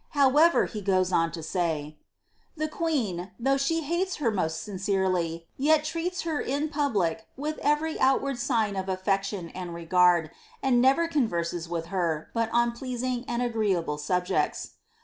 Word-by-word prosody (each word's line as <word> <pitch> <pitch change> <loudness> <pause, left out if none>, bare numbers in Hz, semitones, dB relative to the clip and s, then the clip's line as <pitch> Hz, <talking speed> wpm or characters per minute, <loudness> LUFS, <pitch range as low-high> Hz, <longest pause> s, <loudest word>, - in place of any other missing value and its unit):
However, 295 +5 +5
he 215 - -6
goes 185 -2 +1
on 165 -2 +2
to 165 -1 -6
say, 155 -3 -2 0.6
^ - - -36
The 310 +1 -1
queen, 245 - -2
though 270 +3 +2
she 325 +4 0
hates 345 +5 -1
her 245 -7 0
most 160 -2 -2
sincferely, 185 -4 -1
yet 300 +2 +3
treats 335 +4 -3
her 320 -3 -1
in 285 +4 -1
public 220 - 0
with 305 +3 -3
every 295 +2 0
outward 270 0 +2
sign 220 -4 +1
of 190 0 -3
af* 185 0 -2
fection 195 -2 -1
and 175 -1 -6
regard, 170 -1 +3 0.3
and 250 -3 +4
never 275 +6 +4
converses 175 - -1
with 170 -1 -3
her, 165 -4 -1
but 230 -1 0
on 235 0 +3
pleasing 250 0 -3
and 240 +1 -1
agreeable 200 -10 0
subjects.'' 180 +4 -1
220 Hz, 160 wpm, -27 LUFS, 180-275 Hz, 0.6 s, However